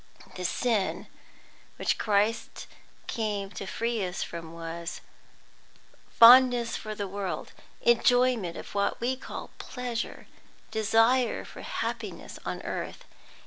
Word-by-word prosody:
The 180 - -5
sin 220 0 0 0.7
which - - 0
Christ 215 +2 0 0.4
came 205 -4 -2
to 195 - -6
free 230 +1 -1
us 180 0 -2
from 165 -1 -7
was 165 0 -6 1.1
fondness 245 0 +7
for 215 0 -5
the 205 -2 -3
world, 195 -1 -4 0.3
enjoyment 235 -5 +3
of - - -9
what 200 0 0
we 250 +3 0
call 260 - -8
pleasure, 245 -2 -4 0.5
desire 225 +3 +3
for - - -10
happiness - - -5
on - - -4
earth. - - -5
220 Hz, 110 wpm, -28 LUFS, 195-240 Hz, 1.1 s, fondness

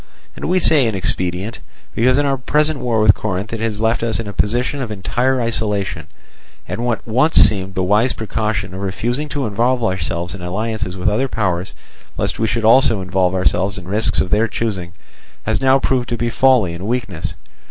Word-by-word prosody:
And - - -6
we 180 +3 +2
say 155 -7 +5
inexpedient, 95 0 -2 0.3
because 125 +3 +3
in 145 - +2
our 140 -1 +2
present 150 +3 +1
war 120 -3 0
with 105 -2 +6
Corinth 100 +1 -4
it 115 - -3
has 110 -1 -2
left 115 +1 +1
us 115 -1 -1
in 115 - -4
a 100 - -6
position 120 +8 0
of 120 - -4
entire 120 +6 0
isolation, 110 -4 -2 0.6
and 115 +3 -4
what 120 -1 -2
once 130 +8 +2
seemed 95 -2 +4
the 95 - 0
wise 105 +7 +2
precaution 105 -4 -3
of 95 - -6
refusing 120 +9 -2
to 145 -1 -2
involve 120 +4 0
ourselves 90 -3 -2
in 100 - -8
alliances 105 +1 -3
with 90 - -2
other 120 +6 +1
powers, 95 -6 -2 0.4
lest - - -2
we 110 - +1
should 110 +1 -1
also 115 -2 +5
involve 95 0 0
ourselves 95 +2 +1
in 90 -2 -9
risks 110 +4 +2
of 90 - -1
their 110 +2 +3
choosing, 95 -6 -3 0.5
has 110 -1 0
now 135 0 +5
proved 130 -2 0
to 120 - -2
be 120 +1 -1
folly 125 -9 +3
and 90 +4 -6
weakness. 110 -9 -3
110 Hz, 195 wpm, -18 LUFS, 95-120 Hz, 0.6 s, with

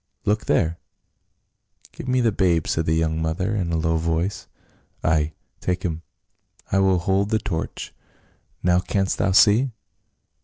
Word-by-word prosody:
Look 105 +1 0
there 85 +1 +1 0.6
!" - - -31
"Give - - -9
me 130 0 +2
the 115 -2 +3
babe," 85 -5 +2
said 80 0 -1
the 80 - +2
young 80 0 0
mother, 80 +6 -1
in 90 -5 -1
a 85 - +1
low 80 0 +1
voice. 85 +4 -2 0.3
" - - -38
Ay, 80 0 +1 0.3
take 90 0 -2
him; 80 -2 -2 0.7
I 95 - +3
will 95 -1 +3
hold 95 +3 +1
the 110 - +2
torch. 95 -6 -4 0.7
Now, 90 0 +4
canst 95 +2 -1
thou 95 - +2
see 110 +7 +5
90 Hz, 160 wpm, -23 LUFS, 80-100 Hz, 0.7 s, see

